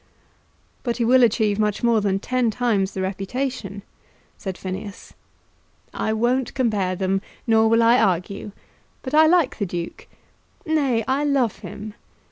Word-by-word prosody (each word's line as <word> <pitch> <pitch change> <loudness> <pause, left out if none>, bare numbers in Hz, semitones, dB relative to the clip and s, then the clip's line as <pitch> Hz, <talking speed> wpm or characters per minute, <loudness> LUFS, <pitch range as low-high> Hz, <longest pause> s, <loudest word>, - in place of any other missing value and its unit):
"But 235 -2 -2
he 235 - +1
will 255 +2 +5
achieve 220 -3 +2
much 210 0 0
more 230 -2 +3
than 195 -1 +1
ten 250 +3 0
times 210 -4 0
the 190 - -2
reputation," 200 +2 -4 0.5
said 190 -2 -6
Phineas. 195 +2 -7 0.8
"I 220 - -1
won't 240 +4 0
compare 210 -8 0
them, 190 +1 0 0.2
nor 225 -1 +4
will 230 +1 +4
I 235 +2 +5
argue; 195 +1 -1 0.5
but 260 - -6
I 315 +1 +6
like 330 -7 +2
the 205 - 0
Duke. 170 -1 -6 0.6
Nay; 275 -8 +1
I 270 +3 +1
love 270 -8 +1
him. 205 +2 -8
220 Hz, 145 wpm, -22 LUFS, 195-250 Hz, 0.8 s, I